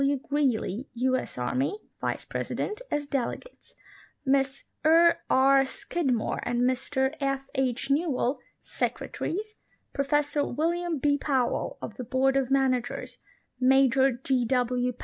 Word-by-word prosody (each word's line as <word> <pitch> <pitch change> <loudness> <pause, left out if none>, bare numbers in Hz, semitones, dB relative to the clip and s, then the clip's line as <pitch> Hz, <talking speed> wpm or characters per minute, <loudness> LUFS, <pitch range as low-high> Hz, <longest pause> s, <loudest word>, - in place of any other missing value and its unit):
W. 280 +1 +2
Greely, 260 -4 -1
U. 255 +2 +2
S. 255 - -4
Army, 255 - -1 0.2
Vice - - -2
President, 425 +3 -3
as 295 0 -1
delegates; 280 - -5 0.5
Miss 270 0 +1 0.2
E. 330 +2 +6 0.2
R. 270 +1 +5
Scid 275 +2 -2
more 230 -3 -1
and 240 0 -1
Mr 265 +2 0
F. 275 0 -1
H. 260 -1 -1
Newell, 280 -3 +1 0.2
Secretaries; 425 +5 -3 0.4
Professor 290 +1 +1
William 335 +4 -1
B 285 +1 +2
Powell, 265 -5 0
of - - -6
the 255 - -4
Bqard 260 +3 +1
of 270 -2 +1
Managers; 265 -3 0 0.4
Major 265 0 +4
J. 255 +1 0
W. 250 0 +1
270 Hz, 130 wpm, -27 LUFS, 255-290 Hz, 0.5 s, E